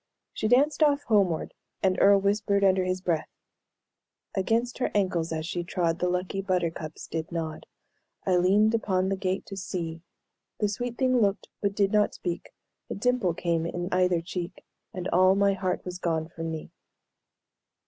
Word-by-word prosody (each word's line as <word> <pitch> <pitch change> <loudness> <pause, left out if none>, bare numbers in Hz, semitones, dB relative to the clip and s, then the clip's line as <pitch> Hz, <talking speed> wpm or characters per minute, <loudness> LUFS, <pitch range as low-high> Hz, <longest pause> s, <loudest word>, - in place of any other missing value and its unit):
She 215 - -1
danced 280 +7 +3
off 290 -1 +4
homeward, 195 - +1 0.3
and 190 -1 +3
Earle 200 0 +7
whispered 200 0 +1
under 190 -1 +4
his 185 0 -1
breath: 165 -4 -1 1.0
"Against 225 +6 0
her - - +1
ankles 180 -5 +1
as 160 -1 -2
she 175 0 -3
trod, 170 -1 -1
The 180 - +1
lucky 180 +2 -1
buttercups 170 -5 -2
did 160 -1 -4
nod; 160 -2 -4 0.6
I 185 -2 +3
leaned 205 +5 +4
upon 190 -4 +1
the 195 - +1
gate 190 0 -2
to 195 - -8
see 170 -4 -4 0.6
The 210 - +1
sweet 245 +3 -4
thing 255 -2 +3
looked, 200 -1 0
but 200 -1 0
did 200 -1 +2
not 210 -1 +2
speak 175 -2 -4 0.4
A - - -3
dimple 225 -5 +1
came 170 -1 0
in 175 +1 -3
either 180 -2 +2
cheek, 175 +1 -6 0.3
And 180 0 -4
all 185 +2 +5
my 200 0 +3
heart 185 -1 -2
was 180 0 -5
gone 160 -3 -1
from 165 0 -5
me!" 160 -1 -6
185 Hz, 170 wpm, -27 LUFS, 175-200 Hz, 1.0 s, Earle